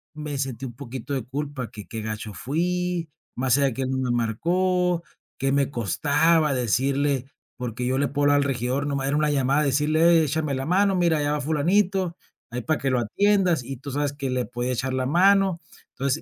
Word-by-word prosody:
me 150 -2 -5
sentí 135 -2 -3
un 120 - -7
poquito 130 +1 -6
de 135 -3 -1
culpa 135 -2 -4
que, 105 0 -9
qué 110 - -5
gacho 110 -1 -5
fui 175 - -1 0.3
más 130 0 +2
allá 140 -1 +2
que 135 - -3
él 130 - -2
no 130 - -1
me 130 -2 0
marcó. 175 +9 +1 0.3
Qué 135 0 0
me 140 -1 +2
costaba 145 - +2
decirle 135 +2 +1 0.3
porque 125 -1 -4
yo 130 +1 0
le 140 +1 +1
puedo 145 +2 -2
hablar 145 0 +5
al 145 - +3
regidor 130 +1 -1
no 140 - -1
más 135 -1 -1
era 140 +2 +1
1 150 0 +2
llamada 140 +1 +2
decirle: 155 +4 +4
"Échame 155 -1 -1
la 135 0 -3
mano, 195 +4 +3
mira, 170 -3 +2
allá 145 0 0
va 150 - -1
Fulanito, 175 +5 +1 0.3
ahí 125 +1 -4
para 155 +5 0
que 135 - -1
lo 125 - +2
atiendas", 180 - +2
y 135 +2 -6
tú 140 +3 -8
sabes 145 +1 -1
que 140 -2 -4
le 125 -1 -1
podía 120 +2 -3
echar 130 +2 -2
la 130 0 0
mano. 190 +4 +4 0.3
Entonces 140 +3 -1
140 Hz, 205 wpm, -24 LUFS, 130-160 Hz, 0.3 s, hablar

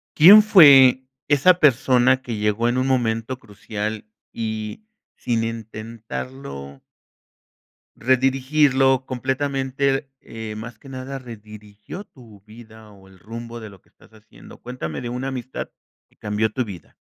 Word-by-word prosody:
¿Quién 200 +7 +9
fue 135 - +7 0.2
esa 145 +5 +4
persona 130 -2 +3
que 120 -3 -5
llegó 105 +3 0
en 125 - -1
un 130 - 0
momento 120 -1 -1
crucial? 105 -1 -6 0.3
y 110 - -5 0.3
sin 115 -2 -2
intentarlo 110 - -7 1.2
Redirigirlo 130 +1 +2
completamente, 135 +1 -2
eh, 110 -1 -8
más 110 +1 -9
que 135 - -14
nada 135 +1 -7
redirigió 105 - -11
tu 115 - -18
vida, 110 0 -15
o 95 -1 -18
el 95 -1 -19
rumbo 115 +3 -9
de 110 -2 -9
lo 95 -3 -17
que - - -32
estás - - -24
haciendo, 110 0 -16
cuéntame 115 - -6
de 120 - -6
una 125 +2 -4
amistad 130 -1 -6 0.4
que - - -32
cambió 105 +1 -1
tu 130 -2 -2
vida. 95 -6 -11
120 Hz, 135 wpm, -21 LUFS, 110-130 Hz, 1.2 s, Quién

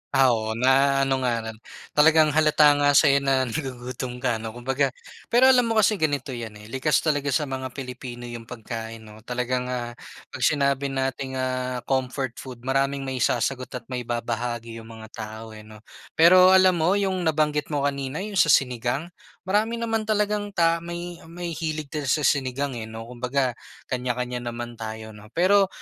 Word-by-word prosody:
Ah, 135 -2 +6
oo, 110 -1 -1
na-ano 135 +1 +3
nga 125 -2 +1
lang, 110 -1 -7 0.3
talagang 155 0 +5
halata 150 -1 +5
nga 145 0 +4
sa'yo 140 -2 +6
na 135 -1 +2
nagugutom 125 -1 -5
ka 120 -3 +1
ano, 110 +1 -7
kumbaga. 135 +3 0 0.4
Pero 260 +2 +6
alam 250 -2 +4
mo 225 - 0
kasi 210 -1 +3
ganito 145 -3 -1
'yan, 115 -3 -6
eh, 110 - -13
likas 135 +3 +1
talaga 145 -3 0
sa 150 +2 +1
mga 130 -1 -4
Pilipino 125 -2 -7
yung 120 -1 -8
pagkain 115 -1 -7
'no. 105 0 -13
Talagang, 125 0 -1
ah, 120 -1 -3 0.4
'pag - - -7
sinabi 140 -1 +2
nating, 135 0 -3
ah, 130 -1 -2
comfort 130 -1 -2
food, 125 -2 -10
maraming 135 +1 0
maisasagot 130 0 -1
at 125 - -5
maibabahagi 120 -1 -3
yung 110 - -12
mga 110 -1 -11
tao, 110 0 -8
eh, 110 - -10
'no. 110 0 -14 0.3
Pero 185 +3 +7
alam 185 -2 +5
mo, 180 +5 +3
yung 190 -4 0
nabanggit 150 -1 +1
mo 145 -2 -2
kanina, 140 +4 -2
yung 205 -3 -2
sa - - +5
sinigang, 130 +4 +1 0.3
marami 210 +5 +1
naman 225 -2 -2
talagang 210 -1 0
ta 165 -1 +3
may 170 0 -7
may 170 0 -6
hilig 155 -3 -4
din 150 -3 -3
sa 150 +3 +1
sinigang, 140 0 +1
eh, 110 - -6
'no, 110 0 -8
kumbaga 125 +1 0 0.4
kanya-kanya 125 0 -2
naman 120 0 -6
tayo 110 0 -6
'no. 105 0 -13
Pero 195 +3 +4
135 Hz, 170 wpm, -24 LUFS, 120-155 Hz, 0.4 s, Pero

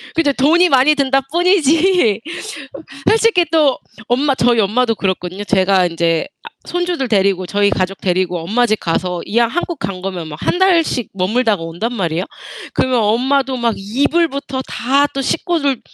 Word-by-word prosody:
그죠. 310 -4 +2
돈이 330 +7 +3
많이 275 +2 +4
든다 270 -1 +1
뿐이지. 340 - +2 0.6
어 - - -3
솔직히 445 -5 +3
또 300 -5 +3 0.3
엄마 270 +3 +1
저희 240 -2 +2
엄마도 225 +3 +1
그렇거든요. 185 0 -3
제가 190 -2 +2
인제 165 -1 0 0.2
아 - - -9 0.2
손주들 350 -6 -2
데리고 195 -3 +1
저희 205 +1 +1
가족 185 +1 -2
데리고 180 -1 -1
엄마 220 +9 +1
집 215 -2 0
가서 175 +1 -2
이왕 235 +2 +2
한국 345 0 -3
간 195 -7 -5
거면 180 -4 -5
막 150 - -8
1 - - -1
달씩 335 - +2
머물다가 205 0 0
온단 175 +9 -4
말이에요. 175 -3 -2 0.5
그러면 255 -2 0
엄마도 260 +5 +1
막 235 -2 0
이불부터 275 +5 -1
다 270 +4 +1
또 275 - -2
식구들 285 -4 -1
245 Hz, 330 characters per minute, -17 LUFS, 195-285 Hz, 0.6 s, 많이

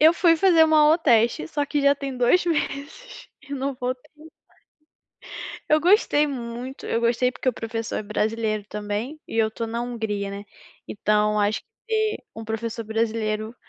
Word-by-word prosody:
Eu 320 +3 +7
fui 335 -2 +4
fazer 345 -3 +5
uma 315 -1 +4
aula 305 +3 +5
teste 235 - +3
só 290 - -1
que 295 0 0
já 280 0 +5
tem 275 -2 -5
2 250 +9 +3
meses 315 - -3
e 280 - -11
não 275 0 -2
voltei 250 +1 -5 1.4
mais. - - -9
Eu 305 0 +4
gostei 345 -5 +4
muito, 250 -1 -6
eu 230 - 0
gostei 240 +2 +2
porque 255 - -3
o - - +3
professor 225 0 -4
é - - -2
brasileiro, 215 0 -1
também, 210 +8 -4
e - - -5
eu 220 -1 +4
estou 230 +1 -5
na 230 +1 -3
Hungria 220 -5 -3
né. 200 +1 -7 0.4
Então 210 0 +1
acho 205 +1 0 0.3
que, 435 -1 +1 0.2
um 225 - -7
professor 225 +1 -4
brasileiro, 220 0 -1
235 Hz, 170 wpm, -24 LUFS, 220-290 Hz, 1.4 s, Eu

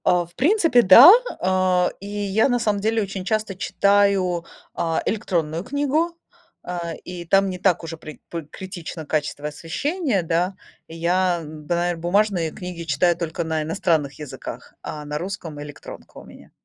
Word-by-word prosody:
А, 175 -1 +3
в 175 0 -23
принципе, 325 - +4
да, 235 - +10 0.3
э. 185 -1 +2
И 200 - -9
я, 205 +3 +1
на 245 -1 +1
самом 210 -3 0
деле, 220 +2 +1
очень 195 -1 -5
часто 215 -2 -1
читаю, 195 -3 +2 0.3
а, 165 -1 -1
электронную 170 -6 -1
книгу, 290 +6 0 0.5
э, 170 -2 -4
и 180 -1 -7
там 195 +3 +3
не 185 - -4
так 180 -2 +1
уже 165 0 -6
при 155 -1 -11
п 170 -1 -5
критично 180 -4 -7
качество 150 -1 -2
освещения, 215 - -2
да. 175 +3 0 0.3
Я, 175 +2 0
да, 155 +2 -4
наверно, 175 -1 -1
бумажные 175 -2 +1
книги 180 -3 -7
читаю 165 +2 +2
только 170 0 -3
на 160 -1 -1
иностранных 155 -4 0
языках, 150 -3 -8
а 150 - -6
на 150 0 -3
русском 170 -4 -6
электронка 145 -1 -11
у - - -10
меня. - - -15
180 Hz, 160 wpm, -22 LUFS, 165-200 Hz, 0.5 s, да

